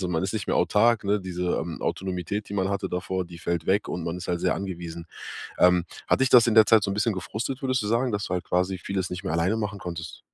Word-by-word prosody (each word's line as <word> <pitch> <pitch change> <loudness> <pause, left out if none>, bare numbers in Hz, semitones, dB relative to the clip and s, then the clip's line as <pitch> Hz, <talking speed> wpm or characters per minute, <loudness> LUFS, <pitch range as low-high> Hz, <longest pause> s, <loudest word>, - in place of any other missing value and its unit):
so 90 - -2
man 80 -1 0
ist 95 - -1
nicht 105 - -2
mehr - - +1
autark, 115 +1 +3
ne? 100 +1 +1
Diese, 90 -1 -2
ähm, 80 0 -5
Autonomität, 95 +2 -3
die - - -4
man 95 -1 +1
hatte 100 -1 -2
davor, 90 +1 -2
die 85 -1 -11
fällt 85 0 -2
weg 100 +2 +2
und 85 - -3
man 85 +1 -3
ist 90 - -8
halt 85 -1 0
sehr - - +2
angewiesen. 85 -3 -6 0.5
Ähm, 90 -1 +5 0.2
hat - - +3
dich 135 - +3
das 120 -1 +7
in 115 - +2
der 110 -1 +8
Zeit 110 0 +5
so 100 - -1
'n - - -1
bisschen 105 +2 +1
gefrustet, 110 +8 -4
würdest 130 -2 +1
du - - -2
sagen, 120 +2 +1
dass 100 -1 -1
du 90 - -3
halt 90 - -2
quasi 90 +1 0
vieles 95 +1 -3
nicht 90 - -5
mehr 80 - -2
alleine 90 +6 +1
machen 105 -2 -3
konntest? 85 -3 -6
95 Hz, 275 wpm, -26 LUFS, 90-105 Hz, 0.5 s, der